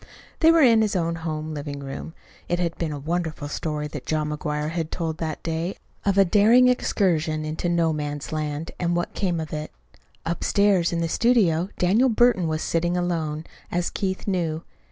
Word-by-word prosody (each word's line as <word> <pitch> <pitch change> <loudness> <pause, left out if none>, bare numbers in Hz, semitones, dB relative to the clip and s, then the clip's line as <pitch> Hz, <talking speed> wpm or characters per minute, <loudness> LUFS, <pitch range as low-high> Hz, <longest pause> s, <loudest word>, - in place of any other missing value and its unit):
They 325 0 +6
were 330 -2 +5
in 230 -3 +6
his 210 -2 0
own 170 -2 0
home 155 -1 -4
living 145 -1 -5
room. 140 +4 -7 0.3
It 175 - +1
had 170 -2 -1
been 165 -2 -1
a 145 - -4
wonderful 160 0 -3
story 150 0 -3
that 145 -3 -8
John 155 -1 0
McGuire 150 0 -2
had 165 -2 -2
told 160 -2 -3
that 160 -2 -4
day 165 +3 -2 0.3
of 200 -1 +2
a 195 - +7
daring 225 +7 +5
excursion 160 -10 +1
into 155 +3 -2
No 170 -2 +2
Man's 145 -1 -4
Land, 155 0 -3
and 175 -1 0
what 175 0 -2
came 180 -4 -1
of 155 -1 -5
it. 155 0 -4 0.5
Upstairs 180 +2 +2
in 170 -1 -1
the 165 - 0
studio 190 -5 +2
Daniel 215 +9 +3
Burton 230 -6 +3
was 155 0 -1
sitting 175 +1 0
alone, 165 -3 -2 0.3
as 175 0 -1
Keith 190 -2 -2
knew. 170 -5 -1
165 Hz, 185 wpm, -24 LUFS, 155-185 Hz, 0.5 s, a